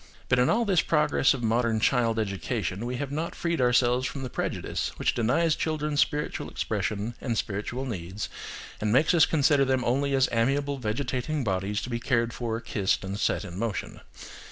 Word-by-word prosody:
But 130 - +4
in 125 - +4
all 235 +1 +2
this 190 -5 +3
progress 150 -2 +3
of 125 - -6
modern 115 0 +2
child 115 -1 +2
education, 100 0 -2
we 125 - -3
have 140 +2 -4
not 160 +3 -3
freed 170 -4 -1
ourselves 125 +1 +3
from 135 - -6
the 130 - -5
prejudice - - -2
which - - +1
denies 155 +8 +2
children 150 -2 -2
spiritual 150 0 0
expression 105 +3 -2
and 120 -4 -1
spiritual 105 +7 -3
needs, 95 -3 -4 0.5
and 105 0 0
makes 150 +9 +4
us 165 -3 +6
consider 145 -2 +3
them 130 -1 +1
only 140 +3 +1
as 135 -1 +4
amiable 140 +4 +1
vegetating 125 +5 -2
bodies 100 +1 -1
to - - -5
be 120 - -1
cared 120 -1 0
for, 115 -2 -3
kissed, 100 -6 0
and 100 +2 -4
set 105 - 0
in 90 0 -7
motion. 115 -4 -3
125 Hz, 180 wpm, -27 LUFS, 110-140 Hz, 0.5 s, us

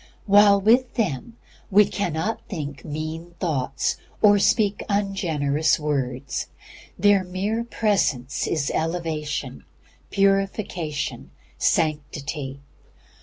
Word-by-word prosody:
While 205 0 +6
with 240 +5 +3
them 215 - -2 0.3
we 210 0 +6
cannot 195 +3 -2
think 145 - -5
mean 160 +3 -6
thoughts 150 -8 -1 0.2
or 205 -1 +6
speak 205 0 +2
ungenerous 160 -8 +1
words. 135 -3 -2 0.5
Their 200 0 +4
mere 195 +5 -2
presence 195 - 0
is 150 -4 0
elevation, 155 -5 -3 0.5
purification, 195 -6 -1 0.3
sanctity. 145 -3 -1
170 Hz, 85 wpm, -24 LUFS, 145-200 Hz, 0.5 s, While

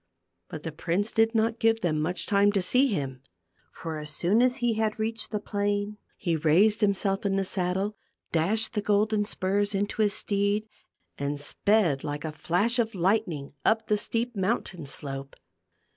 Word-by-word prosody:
But 155 - -7
the 160 - -4
prince 175 +7 -1
did 225 +1 +2
not 225 +1 +1
give 225 0 +3
them 155 -4 0
much 180 +3 -1
time 200 0 +4
to 195 - +2
see 255 +9 +4
him, 135 - -3 0.5
for 160 -2 -6
as 150 0 -4
soon 180 +9 +2
as 250 0 +3
he 240 -4 +1
had 220 -1 -1
reached 225 0 -2
the 210 - -2
plain, 205 0 -2 0.2
he 170 -3 0
raised 175 +8 +4
himself 195 -1 +1
in 195 -1 +1
the 195 0 0
saddle, 190 +3 -1 0.4
dashed 210 +9 0
the 210 - 0
golden 210 +1 +2
spurs 205 +1 0
into 205 +2 -1
his 205 -2 +3
steed 205 +1 0 0.5
and 140 +1 -2
sped 170 -1 +2
like 145 0 -4
a 155 - -3
flash 180 +10 0
of 225 -2 0
lightning 175 -7 0
up 220 0 +2
the 210 - +4
steep 230 +3 -1
mountain 190 -5 -2
slope. 135 0 -6
200 Hz, 175 wpm, -27 LUFS, 170-220 Hz, 0.5 s, time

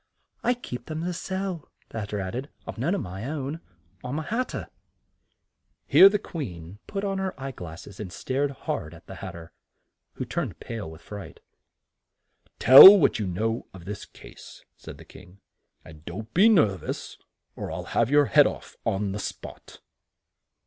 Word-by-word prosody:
"I 245 +1 +2
keep 125 - -8
them 155 +1 -4
to 180 +1 -2
sell," 190 -2 -4 0.2
the 115 - -5
Hat 105 -1 -5
ter 105 - -3
added. 120 +9 -5 0.2
"I've - - -8
none 165 +11 0
of 195 - -2
my 95 +3 -7
own. 145 +2 -4 0.4
I'm 125 +4 -4
a 155 - -3
hat 235 +10 -2
ter." - - -6 1.2
Here 195 - +8
the 210 - +1
Queen 100 - -8
put 200 -1 -4
on 195 -1 -2
her 190 -5 -4
eye 135 0 -5
glass 85 -8 -9
es 100 - -13
and 100 -4 -6
stared 130 +11 -2
hard 135 - -5
at - - -17
the - - -10
Hat - - -6
ter, 85 -1 -11 0.6
who - - -5
turned - - -4
pale 115 -7 -6
with 80 +1 -13
fright. 100 -6 -9 1.2
"Tell 165 - +11
what 150 - +2
you 105 - -2
know 110 +6 -2
of 85 -3 -12
this 100 +1 -6
case," - - -15
said - - -11
the - - -14
King; 90 +3 -16 0.5
"and 75 -1 -14
don't 110 +7 -8
be 200 +6 +6
nerv 105 - +3
ous, - - -6 0.4
or - - -6
I'll - - -5
have 115 0 +2
your 145 +1 +5
head 145 +1 +5
off - - -8
on 100 -3 -1
the 100 - -4
spot." - - -9
125 Hz, 185 wpm, -26 LUFS, -, 1.2 s, Tell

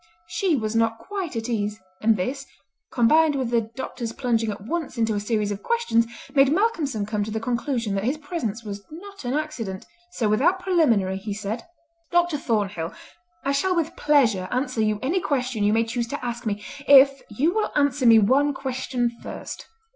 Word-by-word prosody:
She 360 -1 0
was 220 -3 -2
not 225 0 +2
quite 385 - -5
at 225 0 -3
ease, 210 -2 -2 0.2
and 220 0 +4
this, 270 +9 -3 0.4
combined 300 +5 +4
with 260 -3 -1
the 235 -1 +3
doctor's 250 -3 -5
plunging 230 -3 0
at 205 -1 -5
once 320 -1 -3
into 225 -1 +1
a 205 - 0
series 210 -1 -1
of 200 - -4
questions, 465 - +1 0.3
made 275 -1 +5
Malcolmson 310 - +1
come 210 0 -1
to 210 - -5
the 220 +1 -2
conclusion 235 -2 -1
that 195 0 -1
his 260 +7 0
presence 285 - -4
was 200 -2 -6
not 395 +3 -10
an 245 +3 -1
accident, 245 -11 -4 0.3
so 225 - 0
without 280 - +3
preliminary 245 - +2
he 200 +1 -5
said: 215 +3 -4 0.4
"Dr. 345 -3 +2
Thornhill, 200 - -1 0.5
I 275 - +2
shall 360 +7 +1
with 330 -1 -1
pleasure 235 -11 +3
answer 250 -2 -1
you 215 -1 +1
any 335 +8 +1
question 255 -7 -1
you 205 - +3
may 225 +1 +3
choose 235 +1 -2
to 265 +1 -5
ask 240 0 -4
me 205 0 -2 0.2
if 275 0 +7
you 280 +11 +1
will 435 0 0
answer 285 -3 +2
me 230 -1 +8
one 270 +7 +3
question 255 -2 -2
first." - - -7
245 Hz, 185 wpm, -24 LUFS, 215-290 Hz, 0.5 s, me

